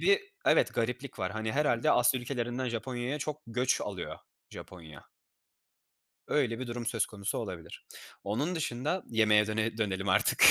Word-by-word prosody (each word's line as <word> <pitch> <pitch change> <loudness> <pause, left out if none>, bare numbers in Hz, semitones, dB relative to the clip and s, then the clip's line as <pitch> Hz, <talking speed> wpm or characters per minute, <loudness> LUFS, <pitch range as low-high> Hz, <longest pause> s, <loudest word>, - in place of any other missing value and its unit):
bir 400 0 +5 0.3
Evet - - +4
gariplik 125 +3 -2
var. 95 +1 -1
Hani, 110 +1 -2
herhâlde 135 -5 +2
Asya 125 +1 +4
ülkelerinden 120 0 -2
Japonya'ya 125 +4 -3
çok 150 +1 -4
göç 125 +2 +1
alıyor - - -5 0.3
Japonya. 80 -6 -11 1.2
Öyle 120 -6 +1
bir 130 - -4
durum 120 -1 -4
söz 115 -4 +1
konusu 100 -1 -3
olabilir. 95 -8 -6 0.4
Onun 140 - -1
dışında 155 +4 -1
yemeğe 105 -2 +4
döne 110 +1 -1
dönelim 95 -3 -1
artık. 95 - +4
120 Hz, 145 wpm, -31 LUFS, 110-130 Hz, 1.2 s, bir